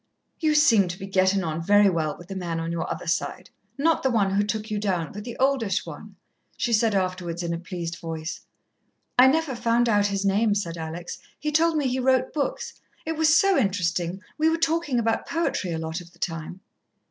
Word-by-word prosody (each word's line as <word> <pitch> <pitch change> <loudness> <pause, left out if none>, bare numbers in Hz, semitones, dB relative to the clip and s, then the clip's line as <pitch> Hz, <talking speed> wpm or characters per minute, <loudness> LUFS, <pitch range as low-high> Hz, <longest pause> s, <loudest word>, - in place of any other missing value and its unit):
"You 310 -2 +2
seemed 230 - +5
to 180 - -5
be 195 - -7
gettin' 190 0 +2
on 160 0 -3
very 205 +4 +5
well 160 -5 0
with 175 - -13
the 195 - -5
man 170 -3 -3
on 165 0 -3
your 170 -1 -3
other - - -5
side 180 +1 -2 0.3
not 320 +3 +2
the 265 - +1
one 205 -5 +2
who 200 +1 +2
took 215 +1 -3
you 210 - -1
down, 180 -6 -1
but 210 - -7
the 235 0 -7
oldish 260 -6 +1
one," - - -10 0.4
she 235 - 0
said 220 -1 +3
afterwards 185 -2 -2
in 170 0 -2
a 165 - -3
pleased 170 -2 -6
voice. 160 -1 -5 0.8
"I 255 - +9
never 310 0 +2
found 235 0 +2
out 205 -2 +3
his 200 0 -2
name," 205 +2 +2
said 170 -5 -2
Alex. 165 +1 -6 0.2
"He 300 - -3
told 320 +1 +3
me 290 -3 +1
he 255 +1 -1
wrote 260 0 +2
books. 290 -3 -3 0.2
It 320 0 -2
was 315 +1 +5
so 390 +1 +3
interesting; 185 - 0 0.2
we 315 +1 +4
were 325 - +1
talking 325 -4 0
about 225 -1 0
poetry 325 - -1
a 165 - -2
lot 160 +2 -4
of 170 0 -15
the - - -21
time." 165 +2 -5
200 Hz, 215 wpm, -25 LUFS, 175-260 Hz, 0.8 s, I